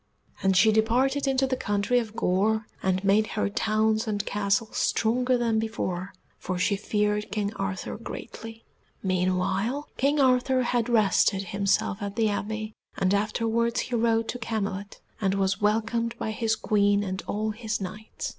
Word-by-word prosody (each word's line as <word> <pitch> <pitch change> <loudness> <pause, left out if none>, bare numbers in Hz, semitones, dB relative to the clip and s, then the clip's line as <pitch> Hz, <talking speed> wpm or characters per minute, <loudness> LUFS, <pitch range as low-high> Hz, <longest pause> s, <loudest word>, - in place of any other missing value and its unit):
And 190 -1 +3
she 215 +4 +6
departed 255 +6 +2
into 270 0 +2
the 260 -1 0
country 205 +2 +1
of 225 -2 -6
Gore, 215 +4 +1 0.2
and 190 0 0
made 205 +2 +3
her 210 - +1
towns 220 +1 +1
and 205 -1 -1
castles 205 +2 0
stronger 250 +3 +2
than 230 -2 +1
before, 195 -4 -3 0.3
for 185 -1 -3
she 195 +3 +2
feared 210 +1 -1
King 205 0 -1
Arthur 195 0 -4
greatly. 225 0 -8 0.4
Meanwhile 185 +8 0
King 285 +2 +2
Arthur 255 -1 +3
had 240 -1 0
rested 200 -3 +3
himself 200 +2 0
at 200 -1 -4
the 220 -2 +2
Abbey, 215 +1 -3 0.2
and 190 0 +2
afterwards 230 +3 +1
he 245 - -3
rode 225 -1 +2
to 245 - -3
Camelot, 200 -4 -4 0.2
and 195 -1 +1
was 195 0 0
welcomed 225 +2 0
by 220 - -3
his 220 0 0
Queen 205 -1 +2
and 190 -1 -3
all 215 +1 -1
his 220 0 -3
Knights. 210 +3 -6
215 Hz, 155 wpm, -26 LUFS, 200-230 Hz, 0.4 s, she